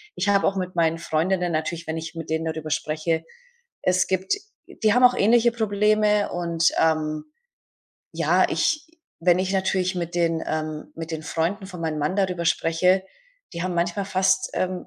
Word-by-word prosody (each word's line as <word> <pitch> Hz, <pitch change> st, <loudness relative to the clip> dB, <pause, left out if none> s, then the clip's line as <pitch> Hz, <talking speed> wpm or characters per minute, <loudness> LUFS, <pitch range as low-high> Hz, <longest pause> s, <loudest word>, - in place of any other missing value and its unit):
ich 200 Hz, +3 st, 0 dB
habe 200 Hz, -1 st, +3 dB
auch 195 Hz, -, 0 dB
mit 185 Hz, -1 st, -4 dB
meinen 165 Hz, -1 st, +2 dB
Freundinnen 175 Hz, +2 st, 0 dB
natürlich 160 Hz, +1 st, -3 dB
wenn 160 Hz, -, -2 dB
ich 165 Hz, +1 st, -6 dB
mit 165 Hz, -1 st, -7 dB
denen 160 Hz, +1 st, -1 dB
darüber 160 Hz, -1 st, -4 dB
spreche 155 Hz, +2 st, -1 dB, 0.6 s
es 185 Hz, 0 st, +2 dB
gibt 190 Hz, 0 st, 0 dB, 0.3 s
die 215 Hz, -1 st, +1 dB
haben 250 Hz, -, +3 dB
auch 250 Hz, 0 st, +7 dB
ähnliche 235 Hz, +3 st, +4 dB
Probleme. 210 Hz, -1 st, +2 dB
Und, 170 Hz, -1 st, +1 dB
ähm, 155 Hz, -1 st, +1 dB, 0.9 s
ja, -, -, +2 dB
ich 315 Hz, 0 st, 0 dB, 0.3 s
wenn 175 Hz, +1 st, +4 dB
ich 190 Hz, +1 st, -1 dB
natürlich 190 Hz, -1 st, 0 dB
mit 175 Hz, -1 st, -4 dB
den 165 Hz, -1 st, +1 dB
ähm, 155 Hz, -1 st, -4 dB
mit 165 Hz, 0 st, -6 dB
den 155 Hz, -, -4 dB
Freunden 170 Hz, +6 st, -2 dB
von 180 Hz, -3 st, -9 dB
meinem 160 Hz, -2 st, -2 dB
Mann 150 Hz, +6 st, -1 dB
darüber 185 Hz, -3 st, 0 dB
spreche, 180 Hz, +3 st, +2 dB, 0.5 s
die 170 Hz, -1 st, -4 dB
haben 185 Hz, -1 st, -2 dB
manchmal 175 Hz, +3 st, 0 dB
fast, 190 Hz, 0 st, +1 dB
ähm, 185 Hz, 0 st, -2 dB
175 Hz, 175 wpm, -24 LUFS, 160-190 Hz, 0.9 s, auch